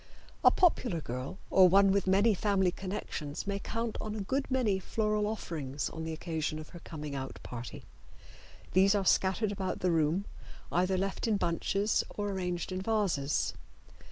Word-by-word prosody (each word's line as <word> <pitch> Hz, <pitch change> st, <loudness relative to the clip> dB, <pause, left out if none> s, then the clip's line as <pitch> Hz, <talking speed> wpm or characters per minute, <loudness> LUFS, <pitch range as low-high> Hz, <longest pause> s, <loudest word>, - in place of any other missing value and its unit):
A -, -, +9 dB
popular 245 Hz, -, +2 dB
girl 130 Hz, +5 st, -5 dB
or 185 Hz, -1 st, +7 dB
one 195 Hz, +1 st, +6 dB
with 195 Hz, -1 st, +1 dB
many 200 Hz, +4 st, +4 dB
family 190 Hz, -2 st, +2 dB
connections 175 Hz, -6 st, -5 dB
may 200 Hz, 0 st, -2 dB
count 230 Hz, +2 st, -3 dB
on 215 Hz, 0 st, -4 dB
a -, -, -4 dB
good 270 Hz, +8 st, -1 dB
many 240 Hz, -7 st, +1 dB
floral 210 Hz, +2 st, 0 dB
offerings 150 Hz, -10 st, -3 dB
on 160 Hz, -, -6 dB
the 160 Hz, -, -3 dB
occasion 155 Hz, -1 st, -3 dB
of 155 Hz, 0 st, -8 dB
her 175 Hz, -, -10 dB
coming 150 Hz, -3 st, -7 dB
out 135 Hz, -1 st, -5 dB
party. 120 Hz, 0 st, -7 dB, 0.9 s
These 195 Hz, +2 st, +5 dB
are 200 Hz, -2 st, +1 dB
scattered 190 Hz, +3 st, +2 dB
about 190 Hz, -2 st, -3 dB
the 180 Hz, -, +2 dB
room, 165 Hz, +4 st, +1 dB, 0.5 s
either 185 Hz, +2 st, +2 dB
left 195 Hz, +4 st, -1 dB
in 215 Hz, -2 st, +2 dB
bunches 195 Hz, +4 st, +1 dB
or 205 Hz, -1 st, -3 dB
arranged 180 Hz, -2 st, -3 dB
in 185 Hz, 0 st, -2 dB
vases. 190 Hz, -10 st, 0 dB
190 Hz, 165 wpm, -31 LUFS, 160-205 Hz, 0.9 s, A